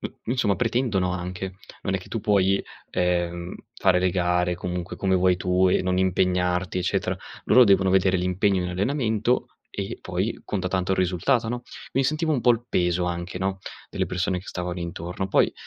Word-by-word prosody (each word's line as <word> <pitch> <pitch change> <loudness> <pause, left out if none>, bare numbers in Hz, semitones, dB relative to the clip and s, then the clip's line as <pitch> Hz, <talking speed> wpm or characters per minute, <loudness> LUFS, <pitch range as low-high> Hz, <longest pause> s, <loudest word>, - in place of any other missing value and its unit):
mhmm, - - -6
insomma, 115 -5 +1
pretendono 115 -6 +1
anche. 90 +1 -5 0.3
Non 95 - -1
è - - +1
che 90 - -13
tu 115 - -3
puoi, 100 -1 +2 0.3
ehm, 85 0 -1 0.2
fare 90 -1 +3
le 90 0 +2
gare, 90 0 +1
comunque, 90 0 -4
come 95 -1 +1
vuoi 90 0 +3
tu 90 +1 +2
e - - +2
non 90 0 0
impegnarti, 90 -1 +1
eccetera. 90 - 0 0.3
Loro 125 -1 +7
devono 95 -2 +4
vedere 95 0 +3
l'impegno 90 +1 +1
in 90 - -2
allenamento, 110 +3 0 0.2
e - - -5
poi - - -2
conta - - -2
tanto 95 0 -1
il - - -1
risultato, 95 +7 +1
no, 120 0 -3 0.3
quindi 135 +1 +1
sentivo 155 +2 +1
un 130 - +1
pò 120 - +4
il 115 0 -3
peso 90 0 +1
anche, 85 +1 -3
no, 95 0 -1 0.3
delle - - -1
persone 90 +1 -1
che 95 - -17
stavano 90 0 -4
intorno. 85 +2 -4
Poi - - +3
95 Hz, 185 wpm, -25 LUFS, 90-100 Hz, 0.3 s, Loro